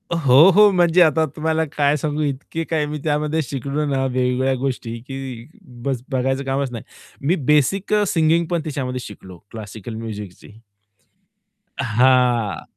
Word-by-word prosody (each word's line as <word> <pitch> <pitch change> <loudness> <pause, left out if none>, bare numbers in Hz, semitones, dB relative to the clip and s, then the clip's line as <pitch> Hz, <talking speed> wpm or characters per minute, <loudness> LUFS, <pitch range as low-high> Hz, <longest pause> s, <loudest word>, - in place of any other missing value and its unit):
अ, 170 - -1
हो, 145 +1 +6
हो. 210 0 +7
म्हणजे 175 -1 +3
आता 160 -1 +4
तुम्हाला 160 +1 0
काय 145 0 +3
सांगू 150 +1 -2
इतकी 145 +3 -3
काही 155 -2 0
मी 150 +1 -4
त्यामध्ये 150 +1 0
शिकलो 140 +3 -3
ना 135 -2 0
वेगवेगळ्या 130 +1 0
गोष्टी 125 -3 -3
की 135 -3 -7 0.4
बस 135 -4 -1
बघायचं 135 +1 0
कामच 135 0 -1
नाही. 115 -3 -7 0.4
मी 175 - +3 0.2
बेसिक 180 +8 +2
अ, 210 0 +3
सिंगिंग 165 0 +2
पण 170 -2 0
त्याच्यामध्ये 130 -5 -4
शिकलो 95 -3 -12
क्लासिकल 110 0 -8
म्युझिकची. 105 -5 -8 1.3
हां, 120 - +2
135 Hz, 145 wpm, -20 LUFS, 125-155 Hz, 1.3 s, हो